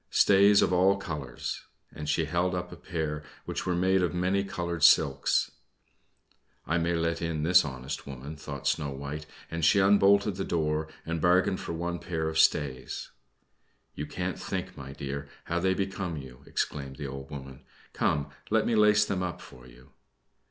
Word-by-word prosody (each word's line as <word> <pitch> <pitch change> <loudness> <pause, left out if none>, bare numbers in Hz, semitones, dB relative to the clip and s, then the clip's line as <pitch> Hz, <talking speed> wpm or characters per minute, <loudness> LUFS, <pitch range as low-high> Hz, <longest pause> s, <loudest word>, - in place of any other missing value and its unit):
"Stays 100 +1 +6
of - - +1
all 95 +2 +4
colors." 75 -10 -5 0.3
And 75 -1 -5
she 80 +2 +2
held 90 +3 0
up 90 0 -4
a - - -7
pair 80 -4 -3 0.2
which - - -4
were 90 - +1
made 95 +2 +3
of 90 -1 0
many 95 +3 +1
colored 85 -4 -3
silks. - - +4 1.1
"I 85 +2 +1
may 85 +1 +1
let 85 0 0
in 80 -2 -2
this 90 +3 +6
honest 65 -1 -6
woman," 70 +3 -7
thought 70 -2 -8
Snow 75 -3 +1
White; 70 +2 -6 0.2
and 85 0 -3
she 100 - +5
unbolted 100 0 +4
the 95 - -1
door 80 -2 0 0.2
and 85 -1 -2
bargained 90 +1 +3
for - - -5
one 85 +1 -3
pair 80 -3 -2
of 80 0 -1
stays. 65 -5 +1 0.8
"You - - -5
can't - - -3
think, - - -4
my 70 0 -8
dear, 70 0 -5
how 85 0 -1
they 95 +1 +2
become 95 -3 -3
you!" 65 -3 -10
exclaimed 70 -2 -3
the 75 - -6
old 70 0 -7
woman. 65 -3 -9 0.3
"Come, 70 -1 0 0.2
let 110 -1 +3
me 120 - +1
lace 105 0 +5
them 95 -3 -2
up 90 -1 -3
for 65 0 -14
you." 60 +1 -17
85 Hz, 175 wpm, -28 LUFS, 70-90 Hz, 1.1 s, Stays